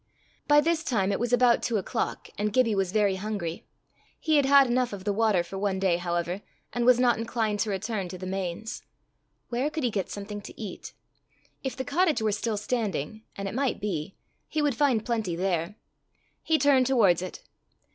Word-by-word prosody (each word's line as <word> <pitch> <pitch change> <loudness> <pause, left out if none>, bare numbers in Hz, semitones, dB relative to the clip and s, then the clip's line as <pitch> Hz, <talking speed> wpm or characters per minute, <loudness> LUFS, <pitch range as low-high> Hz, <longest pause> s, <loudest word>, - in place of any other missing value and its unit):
By 295 0 +6
this 325 +1 +1
time 200 -9 +1
it - - -1
was 240 +1 -1
about 245 -1 +4
two 235 -3 0
o'clock, 220 +4 -3
and 210 +1 -1
Gibbie 230 -1 +3
was 195 -2 0
very 200 -2 +2
hungry. 190 -5 -4 0.5
He 315 -1 +2
had 280 -2 +3
had 280 0 +7
enough 245 -2 0
of 195 -2 -7
the 205 0 0
water 210 -4 +2
for 190 +3 -7
one 195 -1 0
day, 190 -3 +2
however, 175 +2 -2 0.3
and 240 -1 0
was 250 -1 +6
not 245 -2 +3
inclined 225 -2 -1
to 215 - 0
return 200 0 -2
to 185 +1 -7
the 185 - -7
Mains. 190 +3 -4 0.7
Where 250 +4 0
could 310 -1 -4
he 245 - +1
get 195 -3 -2
something 205 0 -6
to - - -12
eat? 205 -5 -7 0.7
If 265 - -3
the 260 - -3
cottage 310 -1 +2
were 220 -1 +1
still 215 +1 -1
standing 210 - -2
and 195 0 -4
it 195 - -5
might 265 0 0
be 190 -4 -3 0.3
he 310 - -1
would 295 -2 +2
find 245 -4 +2
plenty 220 -7 -1
there. 175 +1 -1 0.7
He 320 - +2
turned 270 -3 +4
towards 205 -10 +4
it. 185 - -7
215 Hz, 195 wpm, -27 LUFS, 195-250 Hz, 0.7 s, had